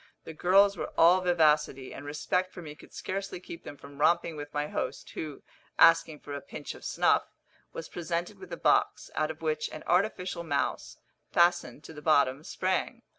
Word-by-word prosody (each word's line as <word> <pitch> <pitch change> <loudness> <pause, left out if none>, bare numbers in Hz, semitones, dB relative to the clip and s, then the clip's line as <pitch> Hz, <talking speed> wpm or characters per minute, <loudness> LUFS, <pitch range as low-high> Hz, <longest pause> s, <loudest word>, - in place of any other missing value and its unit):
The 160 - -8
girls 195 +5 +4
were - - -4
all 175 +3 +6
vivacity, 150 -6 +2
and 140 - -8
respect 180 +5 -1
for 175 - -9
me 150 -2 -8
could - - -17
scarcely 195 -1 -5
keep 170 -2 -10
them 145 - -9
from 140 0 -13
romping 165 +1 +3
with 145 -1 -7
my 145 0 -2
host, - - -4
who, 150 -3 -7 0.3
asking 165 -2 +5
for 145 - -8
a 140 - -5
pinch - - -8
of - - -14
snuff, - - +2 0.4
was 165 - -7
presented 170 0 -4
with 390 - -11
a - - -4
box, - - +1
out 155 0 0
of 160 +1 -8
which 155 -1 -1
an 155 - -9
artificial 180 -2 0
mouse, 145 -4 -2 0.3
fastened 175 -3 +2
to - - -10
the 150 - -10
bottom, 140 -2 +3
sprang. 190 +8 -2
165 Hz, 185 wpm, -29 LUFS, 150-180 Hz, 0.4 s, all